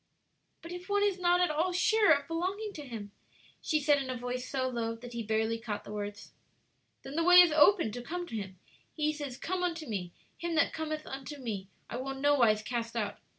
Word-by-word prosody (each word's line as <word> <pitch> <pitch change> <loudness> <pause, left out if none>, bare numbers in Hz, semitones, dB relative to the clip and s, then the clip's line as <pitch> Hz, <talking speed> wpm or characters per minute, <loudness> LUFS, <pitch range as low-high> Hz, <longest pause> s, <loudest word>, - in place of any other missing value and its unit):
'" - - -46
"But 335 - -8
if 355 +2 -8
one 405 0 +2
is 400 -2 +1
not 355 0 +3
at 360 - +3
all 325 +5 +1
sure 410 +3 +4
of 285 -2 +3
belonging 380 +6 -2
to 300 - -7
Him?" 215 -4 -7 0.5
she 310 - +1
said, 290 -1 +3
in 265 - -5
a 255 - -2
voice 250 +1 -4
so 260 -1 0
low 230 -2 -2
that 240 +1 -10
he 235 - -3
barely 220 +1 0
caught 210 -2 -4
the - - -10
words. 205 0 -6 0.7
"Then 270 +2 -8
the 330 - +2
way 360 +1 +6
is 350 -2 +8
open 310 - +5
to 245 +3 -6
come 350 +8 -4
to 235 - -7
Him. 190 -3 -5 0.4
He 305 -1 +1
says, 285 -4 -6
'Come 370 +1 -2
unto 335 -3 -2
me.' 190 -8 -4 0.3
'Him 340 -1 -2
that 320 - +3
cometh 310 -1 -4
unto 270 +2 -7
me, 215 -7 -5 0.2
I 235 - -5
will 270 +2 -3
in 270 - -9
no 290 +1 +4
wise 220 -6 +3
cast 235 0 -3
out.' 210 -3 -2
280 Hz, 235 wpm, -31 LUFS, 230-340 Hz, 0.7 s, is